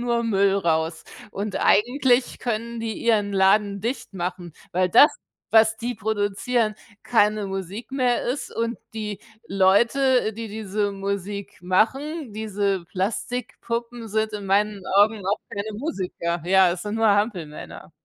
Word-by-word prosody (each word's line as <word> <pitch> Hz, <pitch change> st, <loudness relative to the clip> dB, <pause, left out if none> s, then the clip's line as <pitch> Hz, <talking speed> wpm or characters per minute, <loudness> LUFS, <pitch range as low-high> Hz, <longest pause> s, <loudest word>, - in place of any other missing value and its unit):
nur 235 Hz, -1 st, 0 dB
Müll 200 Hz, -3 st, +3 dB
raus 160 Hz, -3 st, 0 dB, 0.3 s
und 200 Hz, 0 st, -4 dB
eigentlich 245 Hz, +3 st, +2 dB
können 235 Hz, 0 st, -3 dB
die 225 Hz, -2 st, -3 dB
ihren 210 Hz, -3 st, +2 dB
Laden 200 Hz, +1 st, +3 dB
dicht 235 Hz, 0 st, -4 dB
machen, 175 Hz, -2 st, -5 dB, 0.2 s
weil 185 Hz, +1 st, +2 dB
das, 290 Hz, -, +7 dB, 0.4 s
was 220 Hz, 0 st, +5 dB
die 240 Hz, +2 st, -3 dB
produzieren, 215 Hz, +2 st, 0 dB, 0.3 s
keine 210 Hz, -3 st, +2 dB
Musik 195 Hz, +6 st, -6 dB
mehr 250 Hz, -3 st, +1 dB
ist 255 Hz, +4 st, -3 dB
und 230 Hz, +1 st, -1 dB, 0.2 s
die 210 Hz, -3 st, -5 dB, 0.3 s
Leute, 230 Hz, +6 st, +3 dB
die 225 Hz, +1 st, -6 dB
diese 210 Hz, -1 st, -2 dB
Musik 200 Hz, +1 st, -4 dB
machen, 260 Hz, -, 0 dB
diese 200 Hz, -3 st, -1 dB
Plastikpuppen, 235 Hz, +3 st, -4 dB
sind 220 Hz, +1 st, -1 dB
in 205 Hz, -2 st, -5 dB
meinen 200 Hz, +1 st, +1 dB
Augen 205 Hz, 0 st, +4 dB
auch 200 Hz, +3 st, 0 dB
keine 205 Hz, +2 st, -5 dB
Musiker. 180 Hz, -, -3 dB
Ja, 185 Hz, -1 st, +5 dB
es 175 Hz, -, -6 dB
sind 210 Hz, +1 st, -3 dB
nur 225 Hz, 0 st, +3 dB
Hampelmänner. 200 Hz, -7 st, -1 dB
210 Hz, 135 wpm, -24 LUFS, 195-230 Hz, 0.4 s, das